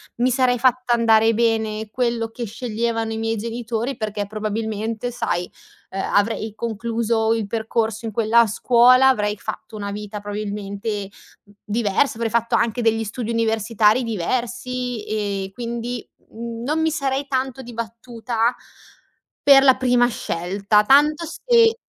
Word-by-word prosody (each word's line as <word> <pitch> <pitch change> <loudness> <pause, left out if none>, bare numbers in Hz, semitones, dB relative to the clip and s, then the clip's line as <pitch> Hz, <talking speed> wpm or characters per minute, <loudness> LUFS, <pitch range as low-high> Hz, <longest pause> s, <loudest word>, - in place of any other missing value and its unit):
Mi 245 +2 +2
sarei 255 0 +2
fatta 250 0 +2
andare 225 -1 +4
bene 220 -1 0
quello 235 -1 -1
che 240 - -6
sceglievano 225 0 -2
i - - -4
miei 225 0 -1
genitori, 235 +3 -3
perché 210 -1 -3
probabilmente 220 +2 -3
sai, 180 -6 -2 0.4
ehm, 195 - -4
avrei 215 +1 +1
concluso 225 0 0
il 225 -2 -1
percorso 220 +1 -2
in 220 - -4
quella 230 +2 +4
scuola, 250 +4 +5
avrei 210 -5 +1
fatto 215 - -7
una 200 -1 -4
vita 210 0 -6
probabilmente 205 0 -4 0.6
diversa, 220 +4 +1
avrei 230 0 -2
fatto 230 0 +1
anche 235 +1 +1
degli 225 -1 +2
studi 225 +2 -4
universitari 225 0 +2
diversi 245 +3 -3
e 200 -2 -3
quindi 235 +1 -5 0.2
non 235 +6 -4
mi 320 0 +2
sarei 275 -3 -1
tanto 265 -1 -2
dibattuta 230 0 -3 0.9
per 275 -1 +8
la 260 -2 +6
prima 245 -1 +3
scelta. 200 0 0
Tanto 295 +6 +4
se 460 +4 +3
230 Hz, 130 wpm, -21 LUFS, 215-245 Hz, 0.9 s, per